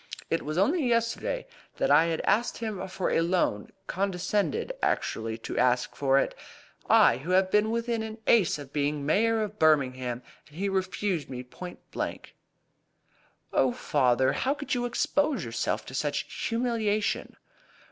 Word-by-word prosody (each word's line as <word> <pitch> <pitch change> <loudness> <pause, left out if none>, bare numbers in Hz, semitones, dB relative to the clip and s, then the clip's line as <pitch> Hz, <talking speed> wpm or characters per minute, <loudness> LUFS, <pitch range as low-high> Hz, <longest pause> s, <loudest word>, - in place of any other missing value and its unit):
It 165 - +1
was 155 +2 -4
only 295 - +2
yesterday 235 - 0 0.3
that 270 - +1
I 165 +1 +5
asked 230 +4 +1
him 210 -4 -4
for 185 0 -2
a - - +3
loan 170 - 0 0.2
condescended 200 - -1
actually 110 0 -1
to 115 - -4
ask 125 0 +2
for 135 -1 +2
it - - +1 0.6
I, - - +6
who 155 +7 -8
have 190 0 +3
been 210 +1 +3
within 230 0 -1
an 220 0 -6
ace 205 -10 +4
of 145 -2 -10
being 145 0 -1
Mayor 220 +8 +2
of 210 0 -6
Birmingham! 130 -5 +2 0.2
And 150 - -16
he 200 +2 -1
refused 190 -3 -1
me 125 -1 -5
point 175 +8 -10
blank." - - -5 1.2
"Oh, - - +3
father! 130 - +2
How 275 +2 0
could 290 -1 -4
you 245 -1 0
expose 275 - 0
yourself 115 0 -2
to - - -10
such 145 +2 -2
humiliation?" 230 -3 -1
190 Hz, 150 wpm, -28 LUFS, 145-230 Hz, 1.2 s, I